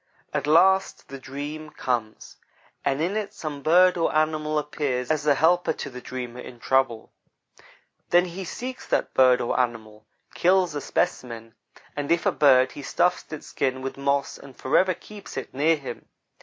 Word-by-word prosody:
At - - -1
last 190 +5 +3
the 135 0 -8
dream 145 +4 -7
comes, 120 -7 -4 0.5
and 140 0 0
in 185 +5 -1
it 215 -2 -3
some 150 -3 -6
bird 180 +5 +5
or 165 - +1
animal 155 0 +1
appears 145 -4 -2
as 150 -1 -1
a 145 - +5
helper 175 +5 +3
to - - -7
the 125 0 -9
dreamer, 125 -1 -6
in 125 -1 -10
trouble. 130 -3 0 1.0
Then 175 +1 +5
he 185 +2 -6
seeks 250 +8 -6
that - - 0
bird 130 -1 +5
or 120 - -1
animal; 110 -3 -3 0.3
kills 180 -1 +3
a 145 - -3
specimen; 115 -4 -2 0.4
and 145 +1 -3
if 170 0 +2
a - - +4
bird, 130 -3 +4
he - - -9
stuffs 175 +5 0
its 155 - -7
skin 130 -1 -2
with 135 - -4
moss 140 0 -1
and 135 -2 -14
forever 185 +7 +2
keeps 205 -2 -11
it 135 - -6
near 155 +5 +3
him. 130 -5 -8
145 Hz, 170 wpm, -25 LUFS, 130-170 Hz, 1.0 s, bird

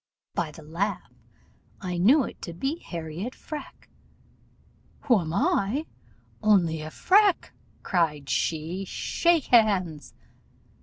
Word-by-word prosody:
By 170 -2 -1
the 155 +1 -12
laugh 180 +7 -3 0.7
I 180 -2 -3
knew 260 - +5
it - - -8
to 170 - -6
be 270 - -3
Harriot 170 - -6
Freke. 305 -1 -9 1.1
'Who 240 -6 +3
am 160 -3 -4
I? 210 - +1 0.6
only 180 -7 +3
a 155 - -6
Freke!' 395 - +3 0.3
cried 150 -6 0
she: 165 +6 -1
'shake 335 - +1
hands. 185 - +2
185 Hz, 110 wpm, -26 LUFS, 160-245 Hz, 1.1 s, knew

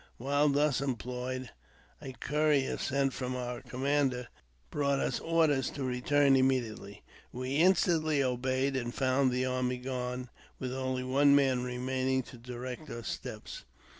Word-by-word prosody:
While 145 +4 +2
thus 145 -1 +2
employed, 125 0 -3 0.5
a 130 - -7
courier, 150 0 +1
sent 135 0 0
from 125 -1 -3
our 125 -1 -4
commander, 130 -1 0 0.4
brought 140 -1 +1
us - - -1
orders 160 -5 +2
to 140 - -5
return 135 +2 +3
immediately. 120 -6 0 0.3
We 130 +3 -3
instantly 160 -4 +3
obeyed, 130 +2 0
and 120 -2 -2
found 130 0 +2
the 125 +1 0
army 125 0 0
gone, 125 0 -4 0.3
with 130 -1 -4
only 130 -1 -2
one 140 +2 +4
man 135 -3 +3
remaining 130 +1 -1
to 120 - -13
direct 125 +4 -7
our 115 0 -6
steps. - - -6
130 Hz, 135 wpm, -31 LUFS, 125-140 Hz, 0.5 s, one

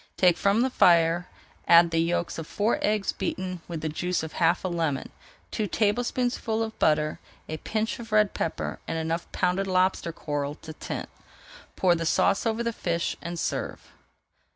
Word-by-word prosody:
Take 180 -2 +5
from 200 +5 +2
the 260 +1 +1
fire, 170 -3 +4 0.4
add 170 0 +7
the 165 - +1
yolks 170 0 0
of 165 - -6
four 210 +2 0
eggs 210 -2 +1
beaten 185 -2 -4
with 165 -3 -5
the 160 - -2
juice 175 +3 -1
of 160 - -6
half 170 +1 +2
a - - 0
lemon, 165 -6 -2 0.4
two 215 -2 -1
tablespoonfuls 225 +2 0
of 220 - -10
butter, 155 0 +2 0.3
a 155 - -4
pinch 220 +8 -2
of 225 -1 -9
red 215 -1 +4
pepper, 165 - -3
and 165 - -2
enough 165 +1 -3
pounded 185 +2 0
lobster 185 -2 +1
coral 145 -2 -3
to 160 0 -10
tint. - - -5 0.7
Pour 180 -2 +4
the 165 -1 -1
sauce 200 +6 +2
over 225 +1 0
the 235 0 -1
fish 170 -5 -1
and 170 0 -5
serve. - - -3
175 Hz, 175 wpm, -26 LUFS, 165-210 Hz, 0.7 s, add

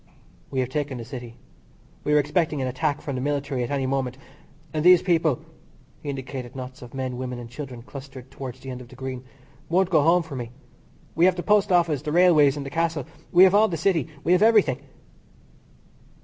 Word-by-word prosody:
"We 130 - -1
have 125 - -2
taken 145 -1 -3
the 115 - -7
City. 120 -2 -8 0.7
We 150 - +1
are - - +6
expecting 150 +1 +1
an 130 - -1
attack 145 +3 -1
from 140 - -4
the 130 - -3
military 140 -2 -1
at 120 - -4
any 140 -2 -1
moment, 130 -1 -1 0.6
and 155 -1 -1
those 180 0 +7
people," 165 -7 +1 0.6
he 145 - -6
indicated 130 -2 -6
knots 130 0 -8
of 125 +1 -11
men, 130 -2 -3
women 125 -1 -4
and 120 -1 -9
children 125 -3 -8
clustered 135 -1 -10
towards 130 -1 -8
the 135 0 -7
end 125 0 -7
of 125 - -11
the 130 - -15
Green, 130 -1 -6 0.5
"won't 185 +2 +2
go 155 -4 +5
home 170 +4 +4
for 160 -4 -8
me. 120 -3 -5 0.6
We 170 - +4
have 185 -1 +4
the 175 - -4
Post 210 -1 +3
Office, 170 -5 +3
and 150 - -18
the - - 0
Railways, 155 -5 +5
and 140 - -5
the 135 - -6
Castle. 165 -3 -1 0.3
We 180 +1 +7
have 190 0 +6
all 215 +2 +5
the 170 - -3
City. 165 +1 +1 0.2
We 170 - +1
have 180 +1 +5
everything." 210 - +4
140 Hz, 215 wpm, -24 LUFS, 130-165 Hz, 0.7 s, those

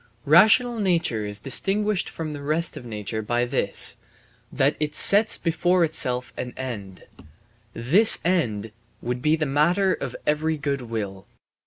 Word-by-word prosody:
Rational 220 - +4
nature 170 - 0
is 105 0 -5
distinguished 200 +7 0
from 160 -2 -6
the 145 - -8
rest 155 +3 -2
of 125 - -10
nature 110 -1 -5
by 120 +3 -1
this, 120 - -3 0.5
that 140 +2 +1
it 150 -1 -3
sets 210 +2 +5
before 175 +2 +1
itself 125 -6 +1
an 125 -1 -6
end. 105 -8 -7 0.7
This 170 - +4
end 115 - -1 0.3
would 125 +1 -3
be 150 +3 +2
the 155 -1 -2
matter 175 +7 +1
of 130 -3 -6
every 155 +1 0
good 140 -2 -3
will. 105 -5 -6
145 Hz, 145 wpm, -23 LUFS, 120-175 Hz, 0.7 s, sets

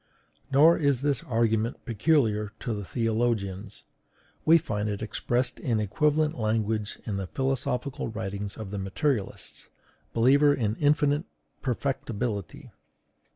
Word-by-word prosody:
Nor 155 +6 +6
is 140 -5 +2
this 140 -3 0
argument 115 -1 0
peculiar 110 -4 +1
to 120 - -2
the 105 -1 -4
theologians; 110 -3 -1 0.6
we 165 +2 +7
find 105 -9 -2
it 105 +1 -3
expressed 120 +3 -1
in 115 -4 0
equivalent 150 +8 +1
language 110 -1 -1
in 100 -3 -2
the 95 -1 -3
philosophical 135 +2 -2
writings 100 -2 -5
of 105 -3 -7
the 100 - -3
materialists, 105 +3 -2 0.4
believers 140 +5 +4
in 110 -3 0
infinite 145 0 +2 0.4
perfectibility. 115 - -3
115 Hz, 115 wpm, -27 LUFS, 105-140 Hz, 0.6 s, we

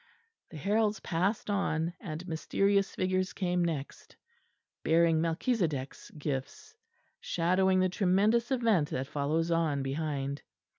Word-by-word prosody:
The 160 - -9
heralds 210 +6 +1
passed 185 +5 -1
on; 170 -4 0
and 165 0 -6
mysterious 195 +4 +1
figures 185 0 0
came 180 -2 0
next, 155 -5 -4 0.7
bearing 165 0 +3
Melchisedech's 165 - -1
gifts; 145 - -5 0.4
shadowing 185 +2 +2
the 185 - +2
tremendous 205 +6 +2
event 225 - +2
that 130 - -2
follows 150 +4 -1
on 160 -4 +1
behind. 140 0 -3
170 Hz, 110 wpm, -30 LUFS, 155-195 Hz, 0.7 s, bearing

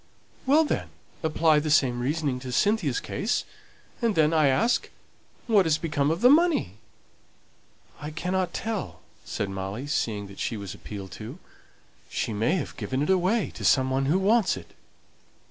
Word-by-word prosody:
"Well, 300 +4 +5
then, - - -2 0.3
apply 160 -1 +3
the 155 +1 -3
same 130 -5 +3
reasoning 140 0 -1
to 125 0 -7
Cynthia's 175 - +1
case; 215 +4 -2 0.6
and 230 -3 +1
then, 155 0 +3
I 155 -3 +4
ask, 140 - +2 0.6
what 205 -6 +4
has 155 -1 +3
become 150 -4 0
of 165 +4 -1
the 250 - +7
money?" 305 - +3 1.2
"I 150 - -5
cannot 180 +3 -2
tell," 220 +1 -4 0.2
said 100 -1 -3
Molly, 95 +6 -5
seeing 110 -8 -1
that 100 0 -12
she 115 - -2
was 100 -2 -6
appealed 100 -3 -8
to. 120 +9 -7 0.7
"She 110 - -2
may 115 - +1
have 170 - -4
given 130 +2 -2
it 150 - +1
away 190 +4 +1
to - - -8
some 130 -1 +3
one 135 +1 +1
who 160 +6 +3
wants 200 0 +3
it." - - -12
155 Hz, 165 wpm, -26 LUFS, 125-190 Hz, 1.2 s, the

